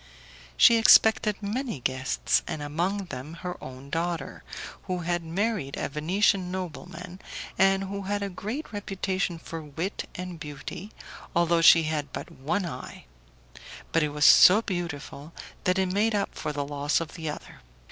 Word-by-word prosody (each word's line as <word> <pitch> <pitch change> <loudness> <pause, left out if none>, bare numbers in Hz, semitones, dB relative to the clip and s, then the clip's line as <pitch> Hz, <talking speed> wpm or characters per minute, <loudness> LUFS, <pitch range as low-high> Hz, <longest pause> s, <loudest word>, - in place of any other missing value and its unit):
She 230 - +7
expected 220 -1 +6
many 225 - -3
guests, 130 - 0
and 150 - -4
among 175 +7 -1
them 130 +6 -7
her 180 0 -5
own 130 +2 -10
daughter, 165 -3 -3 0.4
who 180 -1 -2
had 175 0 -1
married 180 -3 -2
a - - -2
Venetian 180 +5 +1
nobleman, 180 0 -6 0.4
and 195 0 +3
who 200 +1 -4
had 205 +1 -2
a 200 - -2
great 215 - -5
reputation 195 -3 -2
for 165 0 -7
wit 160 +6 -5
and 180 -2 -6
beauty, 150 +6 -7 0.5
although 170 0 +3
she 165 0 +8
had 150 -3 -2
but - - -6
one 160 +8 -2
eye; 170 - -8 0.9
but 165 - +3
it 150 - +1
was 145 0 +1
so 205 +5 +8
beautiful 165 -5 -5 0.3
that 185 +1 +2
it 190 - +2
made 210 +3 +2
up 200 -1 -1
for 150 - -4
the 145 -1 -3
loss 145 +1 0
of 165 -2 -6
the 160 -3 -4
other. 150 - -8
175 Hz, 155 wpm, -27 LUFS, 150-195 Hz, 0.9 s, she